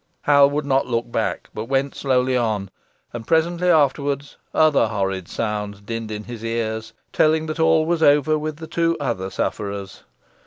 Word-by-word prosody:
Hal 140 Hz, -1 st, +6 dB
would 145 Hz, 0 st, -2 dB
not 135 Hz, -1 st, +1 dB
look 120 Hz, -1 st, -2 dB
back, 115 Hz, -2 st, -2 dB
but 110 Hz, -, -5 dB
went 135 Hz, +2 st, 0 dB
slowly 130 Hz, -1 st, +1 dB
on, 110 Hz, -5 st, -1 dB, 0.4 s
and 115 Hz, -2 st, -7 dB
presently 170 Hz, +2 st, +2 dB
afterwards 140 Hz, -3 st, +1 dB, 0.2 s
other 155 Hz, -7 st, +4 dB
horrid 95 Hz, -4 st, -2 dB
sounds 105 Hz, -2 st, -3 dB
dinned 115 Hz, +1 st, -5 dB
in 105 Hz, 0 st, -5 dB
his 115 Hz, 0 st, -9 dB
ears, 115 Hz, -1 st, -3 dB, 0.2 s
telling 155 Hz, 0 st, +3 dB
that 155 Hz, +1 st, -5 dB
all 160 Hz, -1 st, +4 dB
was 170 Hz, 0 st, 0 dB
over 145 Hz, 0 st, +4 dB
with 155 Hz, 0 st, -3 dB
the 160 Hz, -, -8 dB
two 165 Hz, +1 st, 0 dB
other 95 Hz, -9 st, -2 dB
sufferers. 100 Hz, -1 st, -4 dB
130 Hz, 165 wpm, -22 LUFS, 110-155 Hz, 0.4 s, Hal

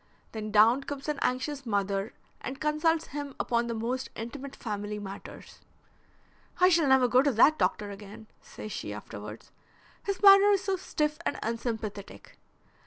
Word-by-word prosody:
Then 215 Hz, -1 st, -5 dB
down 220 Hz, +5 st, +5 dB
comes 285 Hz, 0 st, -6 dB
an 300 Hz, -2 st, -2 dB
anxious 275 Hz, +3 st, -1 dB
mother 200 Hz, -2 st, -1 dB, 0.3 s
and 265 Hz, +1 st, -6 dB
consults 310 Hz, +2 st, +1 dB
him 285 Hz, -1 st, -6 dB
upon 235 Hz, 0 st, 0 dB
the 235 Hz, -, -3 dB
most 245 Hz, +4 st, -3 dB
intimate 270 Hz, +5 st, -7 dB
family 210 Hz, -2 st, -4 dB
matters. 195 Hz, -1 st, -9 dB, 1.0 s
'I 365 Hz, 0 st, +6 dB
shall 330 Hz, -4 st, +3 dB
never 265 Hz, -1 st, +5 dB
go 250 Hz, +1 st, +5 dB
to 285 Hz, 0 st, +2 dB
that 285 Hz, +8 st, +5 dB
doctor 205 Hz, -1 st, 0 dB
again,' 205 Hz, +2 st, -10 dB, 0.2 s
says 215 Hz, -, -9 dB
she 105 Hz, -, -5 dB
afterwards. 105 Hz, +1 st, -9 dB, 0.5 s
'His 395 Hz, 0 st, -4 dB
manner 395 Hz, 0 st, +9 dB
is 390 Hz, -1 st, +1 dB
so 385 Hz, 0 st, 0 dB
stiff 300 Hz, -4 st, -2 dB
and -, -, -2 dB
unsympathetic.' 225 Hz, -3 st, -5 dB
250 Hz, 155 wpm, -29 LUFS, 210-300 Hz, 1.0 s, manner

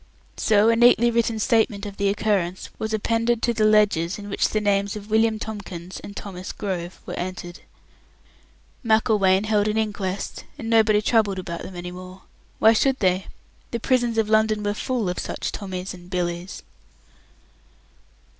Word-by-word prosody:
So 215 Hz, 0 st, +4 dB
a 230 Hz, -, +4 dB
neatly 240 Hz, 0 st, +5 dB
written 230 Hz, -1 st, +1 dB
statement 220 Hz, -1 st, +1 dB
of 200 Hz, -1 st, -7 dB
the 200 Hz, 0 st, +1 dB
occurrence 195 Hz, -3 st, -1 dB
was 220 Hz, 0 st, -3 dB
appended 230 Hz, +2 st, 0 dB
to 235 Hz, -, +2 dB
the 215 Hz, -1 st, +2 dB
ledgers 205 Hz, -5 st, +3 dB
in 205 Hz, 0 st, -8 dB
which 200 Hz, -, +1 dB
the 215 Hz, -, 0 dB
names 200 Hz, -1 st, 0 dB
of 210 Hz, 0 st, -9 dB
William 220 Hz, 0 st, +3 dB
Tomkins 195 Hz, -5 st, -7 dB
and 205 Hz, -, -10 dB
Thomas 185 Hz, -2 st, -7 dB
Grove 180 Hz, -3 st, -5 dB
were -, -, -6 dB
entered. 175 Hz, -1 st, -6 dB, 1.2 s
Macklewain 210 Hz, -4 st, +3 dB
held 215 Hz, -1 st, +1 dB
an 215 Hz, +1 st, 0 dB
inquest, 200 Hz, -3 st, -3 dB
and 230 Hz, -5 st, -5 dB
nobody 215 Hz, -2 st, +4 dB
troubled 215 Hz, -4 st, +2 dB
about 175 Hz, -2 st, -5 dB
them 185 Hz, -, -8 dB
any 175 Hz, 0 st, -6 dB
more. 185 Hz, +1 st, -11 dB, 0.3 s
Why 220 Hz, +1 st, +6 dB
should 265 Hz, +4 st, +2 dB
they? 185 Hz, -3 st, +1 dB, 0.4 s
The 235 Hz, -, -3 dB
prisons 240 Hz, -1 st, +1 dB
of 220 Hz, -1 st, +2 dB
London 215 Hz, 0 st, +2 dB
were 205 Hz, 0 st, 0 dB
full 235 Hz, -1 st, -2 dB
of 180 Hz, -, -2 dB
such -, -, -4 dB
Tommys 185 Hz, -2 st, -5 dB
and 180 Hz, -1 st, -13 dB
Billys. 175 Hz, 0 st, -3 dB
210 Hz, 165 wpm, -23 LUFS, 185-220 Hz, 1.2 s, Why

